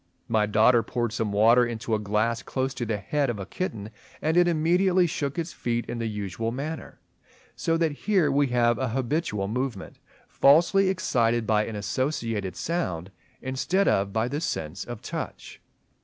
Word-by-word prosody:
My 110 Hz, -2 st, +2 dB
daughter 110 Hz, +3 st, +4 dB
poured 120 Hz, -1 st, -2 dB
some 115 Hz, -3 st, -1 dB
water 115 Hz, +4 st, +5 dB
into 115 Hz, -1 st, -3 dB
a 110 Hz, -, +2 dB
glass 105 Hz, +3 st, 0 dB
close 135 Hz, 0 st, -2 dB
to 120 Hz, -3 st, -4 dB
the 110 Hz, -1 st, -1 dB
head 140 Hz, +8 st, -1 dB
of 120 Hz, -, -2 dB
a 100 Hz, -, -5 dB
kitten; 110 Hz, -, -5 dB, 0.3 s
and 160 Hz, +1 st, 0 dB
it 175 Hz, 0 st, +5 dB
immediately 175 Hz, +3 st, +3 dB
shook 145 Hz, -3 st, -3 dB
its 165 Hz, 0 st, -3 dB
feet 120 Hz, 0 st, -2 dB
in 120 Hz, -, -4 dB
the 115 Hz, -, -1 dB
usual 105 Hz, +1 st, -3 dB
manner; 150 Hz, +6 st, -6 dB, 0.6 s
so 165 Hz, 0 st, 0 dB
that 165 Hz, -2 st, +1 dB
here 170 Hz, 0 st, +1 dB
we 140 Hz, +1 st, +3 dB
have 120 Hz, -1 st, +2 dB
an 130 Hz, -2 st, -1 dB
habitual 120 Hz, -, -1 dB
movement 120 Hz, -2 st, -4 dB, 0.3 s
falsely 175 Hz, +7 st, +4 dB
excited 120 Hz, -11 st, +1 dB
by 105 Hz, -1 st, +2 dB
an 115 Hz, -, -5 dB
associated 115 Hz, -2 st, -2 dB
sound 95 Hz, -, -3 dB, 0.3 s
instead 155 Hz, +10 st, 0 dB
of 100 Hz, 0 st, +2 dB
by 110 Hz, +3 st, 0 dB
the 145 Hz, +4 st, -3 dB
sense 80 Hz, -, -3 dB
of 120 Hz, -3 st, -8 dB
touch. -, -, -6 dB
120 Hz, 170 wpm, -26 LUFS, 110-150 Hz, 0.6 s, water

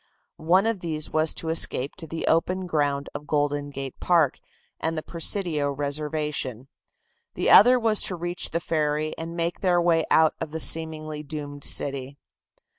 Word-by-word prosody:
One 180 Hz, +6 st, +2 dB
of 225 Hz, -3 st, -1 dB
these 155 Hz, -3 st, -3 dB
was 155 Hz, 0 st, +3 dB
to 160 Hz, -, -5 dB
escape 145 Hz, -4 st, +2 dB
to 160 Hz, -, -8 dB
the 165 Hz, +1 st, -5 dB
open 185 Hz, +3 st, +1 dB
ground 145 Hz, -4 st, -1 dB
of 150 Hz, -, -8 dB
Golden 145 Hz, -1 st, -1 dB
Gate 135 Hz, -2 st, -7 dB
Park 165 Hz, -6 st, +2 dB, 0.4 s
and 160 Hz, 0 st, -2 dB
the 155 Hz, -, -3 dB
Presidio 165 Hz, -4 st, 0 dB
reservation; 145 Hz, -3 st, -4 dB, 0.7 s
the -, -, +1 dB
other 250 Hz, +5 st, +8 dB
was 225 Hz, -2 st, +3 dB
to 185 Hz, -, -2 dB
reach 175 Hz, +1 st, -3 dB
the 170 Hz, -, -2 dB
ferry 155 Hz, -2 st, -1 dB
and 165 Hz, +1 st, -7 dB
make 170 Hz, +1 st, -2 dB
their 180 Hz, -2 st, +2 dB
way 170 Hz, -2 st, +2 dB
out 160 Hz, -1 st, +4 dB
of 165 Hz, -, -3 dB
the 160 Hz, +2 st, -5 dB
seemingly 155 Hz, -1 st, +2 dB
doomed 145 Hz, -1 st, -7 dB
city. 140 Hz, 0 st, 0 dB
155 Hz, 165 wpm, -24 LUFS, 145-170 Hz, 0.7 s, other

